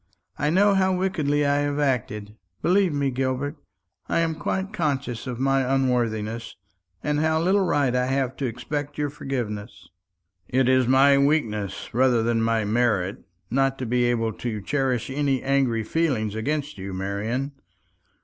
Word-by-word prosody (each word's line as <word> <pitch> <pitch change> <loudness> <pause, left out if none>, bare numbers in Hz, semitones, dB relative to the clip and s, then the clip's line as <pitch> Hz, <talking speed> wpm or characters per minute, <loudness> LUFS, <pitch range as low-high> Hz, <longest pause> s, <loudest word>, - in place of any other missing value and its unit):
"I 150 - +1
know 200 +5 +4
how 190 -1 +3
wickedly 155 -6 0
I 145 0 +2
have 145 0 -1
acted. 110 -7 -1 0.3
Believe 185 0 +3
me, 140 -2 0
Gilbert, 135 +3 -2 0.5
I - - +2
am 165 -1 0
quite 190 +6 -3
conscious 140 - -2
of 125 -2 -4
my 135 0 +2
unworthiness, 120 -4 -1 0.5
and 150 0 0
how 160 +1 +2
little 190 +4 +3
right 140 -7 +1
I 125 0 +1
have 130 -1 0
to 135 - -1
expect 145 +5 -4
your 145 -1 -1
forgiveness." 110 - -5 0.6
"It 130 0 +2
is 130 -1 +4
my 135 +2 +6
weakness, 115 -10 0
rather 125 -1 +3
than 115 0 +1
my 115 -1 +1
merit, 105 -4 +1 0.3
not 135 +1 +2
to 130 - -4
be 120 +1 +1
able 115 -2 0
to 110 -1 -4
cherish 135 -3 -1
any 140 -2 0
angry 135 -5 +1
feeling 125 -8 0
against 145 +2 -2
you, 95 0 -5
Marian. 105 +8 -2
130 Hz, 155 wpm, -24 LUFS, 115-145 Hz, 0.6 s, my